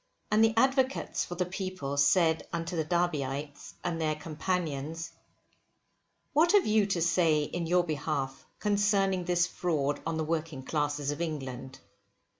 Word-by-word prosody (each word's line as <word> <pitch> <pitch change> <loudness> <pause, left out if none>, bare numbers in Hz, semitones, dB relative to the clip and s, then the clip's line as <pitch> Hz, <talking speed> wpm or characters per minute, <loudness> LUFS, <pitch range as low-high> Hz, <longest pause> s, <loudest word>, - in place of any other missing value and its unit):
And 215 +1 +5
the 225 0 +3
advocates 265 +2 +2
for 175 - -6
the 180 +1 0
people 185 -6 -4
said 160 +3 +3
unto 170 +1 -3
the 160 - +1
Derbyites 150 -4 -2
and 165 -2 -2
their 155 -1 +1
companions, 160 -1 -3 1.2
what 325 +5 +4
have 405 -2 +5
you 215 -1 +3
to 185 -4 0
say 165 -3 +3
in 170 +3 -3
your 175 +1 +3
behalf 150 -4 -3
concerning 200 -3 +1
this 175 0 +3
fraud 150 -6 -1
on 165 0 -2
the 160 - 0
working 155 -3 -3
classes 145 0 -1
of 145 - -5
England? 135 -5 -5
165 Hz, 145 wpm, -30 LUFS, 150-185 Hz, 1.2 s, And